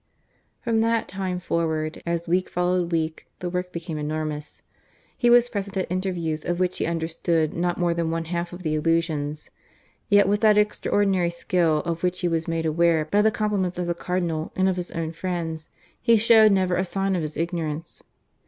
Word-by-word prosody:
From 230 -2 +1
that 230 0 +1
time 185 -1 -3
forward, 160 -3 -2
as 170 0 -1
week 180 +2 +1
followed 180 0 0
week, 160 -1 -2
the 175 -1 -4
work 180 0 -3
became 165 -2 -5
enormous. 150 0 -4 0.5
He 240 -2 +2
was 240 0 +6
present 200 -4 -4
at 185 - -2
interviews 175 -4 -2
of 175 0 -2
which 185 0 0
he - - 0
understood 165 -1 0
not 175 +1 -1
more 175 -1 +1
than 170 -1 -1
one 165 0 -2
half 170 +1 -3
of 180 +1 -9
the 155 -2 0
allusions; 155 -2 -1 0.6
yet 205 -1 +5
with 205 +1 +1
that 215 -2 +5
extraordinary 200 -3 +2
skill 170 -2 +1
of 170 -1 -2
which 180 +1 -1
he 175 - +1
was 165 -1 -1
made 165 -1 -1
aware 160 0 +2
by 200 +7 +2
the 220 - +5
compliments 205 -5 -1
of 180 - -1
the 175 - 0
Cardinal 170 -2 -2
and 190 0 +2
of 185 -1 0
his 180 0 -4
own 165 -1 -3
friends, 165 -2 -4 0.3
he 235 -2 +5
showed 220 -1 +6
never 185 -2 +2
a 185 - +1
sign 195 +1 -1
of 175 - 0
his 155 -1 -4
ignorance. 165 -1 -3
175 Hz, 190 wpm, -24 LUFS, 165-190 Hz, 0.6 s, was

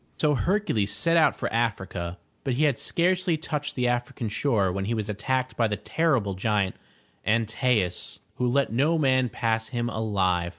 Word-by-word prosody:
So 150 -1 +3
Hercules 145 - 0
set 165 +12 +2
out 155 -4 +5
for - - -3
Africa, 95 -6 -2 0.3
but 135 -4 -1
he 145 - +1
had 145 -5 +2
scarcely 180 -1 +1
touched 150 -2 -4
the 125 -1 +1
African 120 -2 -2
shore, 105 -4 +1
when 95 +1 -2
he 115 +3 -1
was 105 -1 -3
attacked 130 +5 -1
by 115 - +2
the 105 -1 -2
terrible 130 -12 0
giant, 100 0 0 0.5
An 115 +1 +2
tae'us, 110 -5 0 0.2
who 125 - +1
let 135 -1 +1
no 150 +7 +2
man 130 -4 +2
pass 110 -1 -1
him 120 -1 -2
alive. 95 -6 0
120 Hz, 175 wpm, -26 LUFS, 105-140 Hz, 0.5 s, out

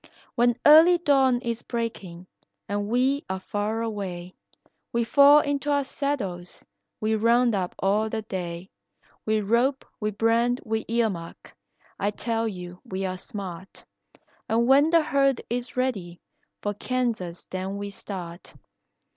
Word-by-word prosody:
"When 240 -1 +2
early 320 +4 +8
dawn 270 -6 +3
is 235 -1 -3
breaking 200 -7 -5 0.4
and 205 0 -2
we 260 +5 +1
are 190 0 -2
far 210 +3 -2
away, 185 -5 -5 0.6
We 235 0 +1
fall 285 +5 +7
into 285 0 -2
our 285 -1 +2
saddles, 200 -12 -4 0.3
we 215 +1 0
round 235 +2 +3
up 185 -3 -2
all 210 +3 +1
the 220 0 -3
day; 180 -2 -6 0.6
We 215 0 +2
rope, 240 +6 +1
we 210 - -1
brand, 230 +4 +1
we 220 0 -2
ear 230 -1 +1
mark, 170 -2 -10 0.4
I 205 - +1
tell 225 +2 -2
you 180 -3 -7
we 190 0 -4
are 185 0 -2
smart, 190 -2 -8 0.6
And 230 +1 +2
when 275 +4 +5
the 330 -1 +4
herd 275 -4 +2
is 245 +2 -4
ready, 195 -10 -2 0.4
for 205 - -1
Kansas 220 -6 -3
then 190 +1 -4
we 200 0 -5
start. 180 -4 -8
220 Hz, 140 wpm, -25 LUFS, 190-250 Hz, 0.6 s, early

